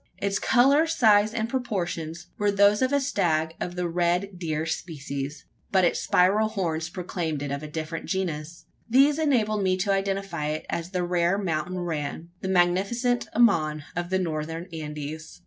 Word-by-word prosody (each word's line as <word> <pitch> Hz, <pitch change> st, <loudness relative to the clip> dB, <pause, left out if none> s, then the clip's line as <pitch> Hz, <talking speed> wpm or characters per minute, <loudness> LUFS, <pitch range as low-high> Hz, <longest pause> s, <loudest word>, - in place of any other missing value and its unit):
Its 200 Hz, 0 st, -1 dB
colour, 275 Hz, +5 st, +4 dB
size, 215 Hz, -9 st, +4 dB
and 225 Hz, 0 st, -1 dB
proportions, 175 Hz, -9 st, -3 dB
were 205 Hz, 0 st, +2 dB
those 200 Hz, +2 st, +4 dB
of 260 Hz, +1 st, +2 dB
a 285 Hz, -, +3 dB
stag 165 Hz, -, 0 dB
of 175 Hz, -, -4 dB
the 180 Hz, -1 st, -1 dB
red 175 Hz, +2 st, 0 dB
deer 160 Hz, -2 st, -2 dB
species; 145 Hz, -3 st, -5 dB, 0.3 s
but 190 Hz, -1 st, +4 dB
its 170 Hz, -, +1 dB
spiral 200 Hz, +4 st, +3 dB
horns 165 Hz, -7 st, -2 dB
proclaimed 170 Hz, -5 st, -3 dB
it 145 Hz, -, -4 dB
of 140 Hz, 0 st, -3 dB
a 155 Hz, -, -6 dB
different 160 Hz, +1 st, -5 dB
genus. 165 Hz, -4 st, -3 dB, 0.2 s
These 280 Hz, +5 st, +5 dB
enabled 220 Hz, -9 st, +2 dB
me 185 Hz, -1 st, +2 dB
to 195 Hz, +2 st, 0 dB
identify 195 Hz, -5 st, -2 dB
it 155 Hz, +1 st, -3 dB
as 170 Hz, +1 st, -3 dB
the 180 Hz, -2 st, -1 dB
rare 175 Hz, +1 st, +1 dB
mountain 180 Hz, -2 st, -2 dB
ram 165 Hz, -1 st, -4 dB
the -, -, -3 dB
magnificent 195 Hz, +7 st, +1 dB
ammon, 155 Hz, -10 st, +3 dB
of 175 Hz, 0 st, -3 dB
the 190 Hz, -, +1 dB
Northern 165 Hz, -1 st, -3 dB
Andes. 150 Hz, +1 st, -6 dB
180 Hz, 165 wpm, -26 LUFS, 160-205 Hz, 0.3 s, These